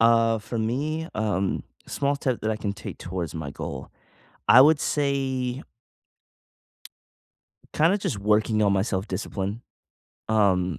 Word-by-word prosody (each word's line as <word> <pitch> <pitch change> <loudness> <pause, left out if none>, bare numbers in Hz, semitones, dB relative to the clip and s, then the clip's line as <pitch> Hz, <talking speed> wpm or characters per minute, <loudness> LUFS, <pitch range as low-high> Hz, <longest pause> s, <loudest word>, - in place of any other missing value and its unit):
Uh, 115 0 +4
for 115 +2 -5
me, 150 +9 -2
um, 100 -3 -1 0.2
a - - -14
small 140 0 0
step 130 -4 -1
that 110 - -1
I 110 - -1
can 100 -2 -3
take 100 -2 -8
towards 90 -2 -5
my 80 -3 -5
goal. - - -6 0.6
I 115 +5 +9
would 150 +2 +6
say 135 -3 -1 2.1
kinda 165 +6 +3
just 115 - -3
working 105 +1 +2
on 100 -2 +3
my 95 - +2
self-discipline. 100 +1 -3 0.7
Um, 95 -6 +2
110 Hz, 135 wpm, -25 LUFS, 100-130 Hz, 2.1 s, I